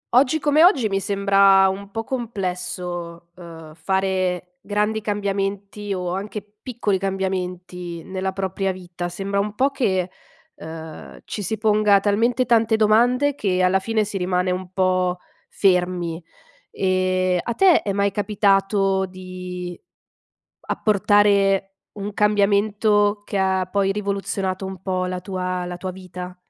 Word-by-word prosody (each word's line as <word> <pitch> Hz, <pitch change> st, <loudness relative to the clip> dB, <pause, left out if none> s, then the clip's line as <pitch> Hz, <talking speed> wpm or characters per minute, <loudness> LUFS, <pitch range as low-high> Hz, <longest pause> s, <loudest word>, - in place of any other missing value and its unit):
Oggi 265 Hz, +4 st, +4 dB
come 300 Hz, +1 st, +3 dB
oggi 270 Hz, -, +4 dB
mi 195 Hz, 0 st, 0 dB
sembra 195 Hz, 0 st, +4 dB
un 195 Hz, +1 st, -6 dB
po' 225 Hz, +2 st, -4 dB
complesso, 180 Hz, -7 st, -4 dB
uhm, 165 Hz, -3 st, -11 dB
fare 185 Hz, 0 st, -1 dB
grandi 210 Hz, +1 st, -1 dB
cambiamenti 200 Hz, 0 st, -3 dB
o 180 Hz, -2 st, -2 dB
anche 205 Hz, +2 st, -5 dB, 0.2 s
piccoli 215 Hz, -6 st, -1 dB
cambiamenti 180 Hz, -3 st, -4 dB
nella 190 Hz, 0 st, -3 dB
propria 190 Hz, 0 st, -2 dB
vita, 175 Hz, -1 st, -6 dB
sembra 195 Hz, +3 st, -2 dB
un 205 Hz, +1 st, -2 dB
po' 270 Hz, +4 st, +2 dB
che, 190 Hz, -9 st, 0 dB, 0.4 s
uhm, 160 Hz, 0 st, -9 dB
ci 210 Hz, -, -5 dB
si 220 Hz, +3 st, -2 dB
ponga 210 Hz, -1 st, +4 dB
talmente 230 Hz, +5 st, +1 dB
tante 225 Hz, -2 st, +3 dB
domande 240 Hz, +6 st, +3 dB
che 185 Hz, -8 st, 0 dB
alla 185 Hz, +1 st, +3 dB
fine 220 Hz, +2 st, 0 dB
si 205 Hz, -1 st, -4 dB
rimane 180 Hz, 0 st, 0 dB
un 180 Hz, 0 st, -4 dB
po' 185 Hz, -1 st, +1 dB, 0.3 s
fermi. 180 Hz, -3 st, +1 dB, 0.5 s
Ehm, 185 Hz, -1 st, +1 dB
a 235 Hz, -, -3 dB
te 375 Hz, -4 st, +5 dB
è 200 Hz, -, -2 dB
mai 200 Hz, 0 st, +1 dB
capitato 195 Hz, -1 st, +1 dB
di 180 Hz, -1 st, -7 dB, 0.9 s
apportare 200 Hz, -2 st, +2 dB, 0.2 s
un 205 Hz, 0 st, -6 dB
cambiamento 205 Hz, 0 st, +2 dB
che 200 Hz, -, -3 dB
ha 190 Hz, -1 st, +1 dB
poi 195 Hz, -1 st, +1 dB
rivoluzionato 195 Hz, -2 st, -2 dB
un 190 Hz, -2 st, -7 dB
po' 185 Hz, -1 st, -1 dB
la 180 Hz, 0 st, -4 dB
tua 185 Hz, -1 st, -3 dB
la 175 Hz, 0 st, -5 dB
tua 185 Hz, +1 st, -5 dB
vita? 180 Hz, -1 st, -9 dB
195 Hz, 135 wpm, -22 LUFS, 185-205 Hz, 0.9 s, te